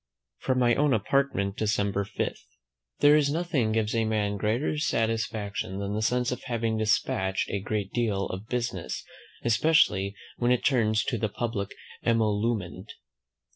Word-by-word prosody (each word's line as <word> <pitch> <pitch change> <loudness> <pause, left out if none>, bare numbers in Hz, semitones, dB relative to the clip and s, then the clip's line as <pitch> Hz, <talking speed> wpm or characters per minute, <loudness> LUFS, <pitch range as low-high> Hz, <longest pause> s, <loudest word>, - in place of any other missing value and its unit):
From 130 - 0
my 120 -1 +4
own 145 0 +3
Apartment, 110 -4 0
December 100 -2 0
5. - - -2 0.7
There 145 +1 +7
is 150 -2 +3
nothing 155 -9 0
gives 110 -1 0
a 115 -1 +2
man 105 -2 0
greater 115 +9 0
satisfaction 110 -7 -1
than 100 0 -3
the 105 - -1
sense 125 +2 +1
of 125 - -4
having 115 -2 -1
despatched 95 -3 0
a 100 - -1
great 105 -1 -3
deal 105 -5 0
of 95 +4 -6
business, 120 -8 -3 0.4
especially 110 - +3 0.2
when 120 - +1
it 125 - +1
turns 110 -5 +3
to 120 - -2
the 110 - 0
public 110 -2 -3 0.3
emolument. 110 -3 0
110 Hz, 145 wpm, -27 LUFS, 100-120 Hz, 0.7 s, There